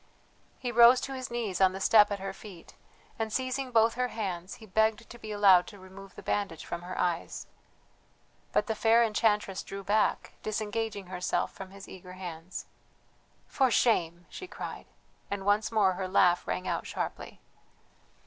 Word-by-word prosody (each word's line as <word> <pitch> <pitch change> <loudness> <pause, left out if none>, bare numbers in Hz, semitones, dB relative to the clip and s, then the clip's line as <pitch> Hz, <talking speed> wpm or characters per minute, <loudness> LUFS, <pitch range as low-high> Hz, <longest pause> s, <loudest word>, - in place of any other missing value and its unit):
He 245 -2 -4
rose 240 +2 +7
to 270 - -4
his 255 -1 -5
knees 225 -6 -3
on 190 -1 +5
the 190 - -5
step 210 +1 +6
at 205 - -1
her 195 0 -5
feet 195 -4 -12 0.5
and, 220 -1 -2
seizing 260 +2 -2
both 225 -1 +4
her 250 +1 0
hands, 190 -6 -4
he 220 - -13
begged 220 +2 +1
to 240 - -12
be 215 -1 -7
allowed 195 -4 +5
to 205 - -11
remove 190 0 -13
the - - -11
bandage 200 -6 -2
from 170 - -5
her 180 +1 -7
eyes. 175 -2 -2 1.1
But - - +2
the 220 - -1
fair 225 +2 +4
enchantress 210 -3 +1
drew 195 0 -8
back, 210 +2 +1
disengaging 215 -1 -3
herself 180 0 -2
from 190 -1 -9
his 195 0 -12
eager 180 -1 -11
hands. 175 -1 -7 0.8
"For 265 -2 +2
shame!" 175 -8 +1
she 375 - -9
cried, - - -7 0.4
and 200 -1 -4
once 205 +2 +2
more 205 -4 +3
her 185 +1 -4
laugh 180 -2 +3
rang 185 - -2
out - - -2
sharply. - - -5
205 Hz, 170 wpm, -29 LUFS, 185-225 Hz, 1.1 s, rose